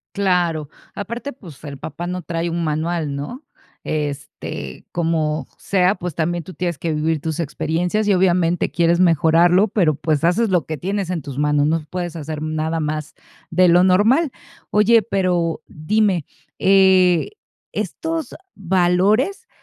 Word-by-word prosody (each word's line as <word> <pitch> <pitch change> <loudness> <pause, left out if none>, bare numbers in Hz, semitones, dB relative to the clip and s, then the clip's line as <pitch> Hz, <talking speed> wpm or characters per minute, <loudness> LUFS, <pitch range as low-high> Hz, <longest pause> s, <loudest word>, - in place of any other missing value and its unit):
Claro, 175 -6 0 0.3
aparte, 235 +7 -5
pues, 175 - -14
el 140 -2 -7
papá 160 +5 -6
no 180 0 -3
trae 170 +1 -2
un 170 0 -2
manual, 155 -1 -1
¿no? 195 - -6 0.4
Este, 140 - -5
como 160 -4 -1
sea, 190 0 +2
pues, 180 -4 -6
también 170 +1 -1
tú 185 - -10
tienes 175 -3 -3
que 165 - -2
vivir 155 0 0
tus 160 +1 -3
experiencias, 170 +6 -1
y 205 - +4
obviamente, 175 -2 +2
quieres 170 0 +2
mejorarlo, 175 +3 +4
pero, 180 -7 +2
pues, 155 +1 -1
haces 185 +7 +2
lo 180 -5 +1
que 155 - -4
tienes 195 +2 -3
en 170 -3 -2
tus 135 -1 -8
manos, 150 0 +2
no 160 0 0
puedes 175 -1 -4
hacer 155 -1 -5
nada 155 +1 -2
más 155 0 -3 0.4
de 180 +2 +4
lo 175 +1 +5
normal. 225 - +3 0.4
Oye, 220 +2 +5
pero, 180 -5 0
dime, 185 +1 0 0.3
eh, 190 -3 +4 0.4
estos 320 - -3 0.2
valores, 195 - +1
175 Hz, 145 wpm, -20 LUFS, 155-190 Hz, 0.4 s, lo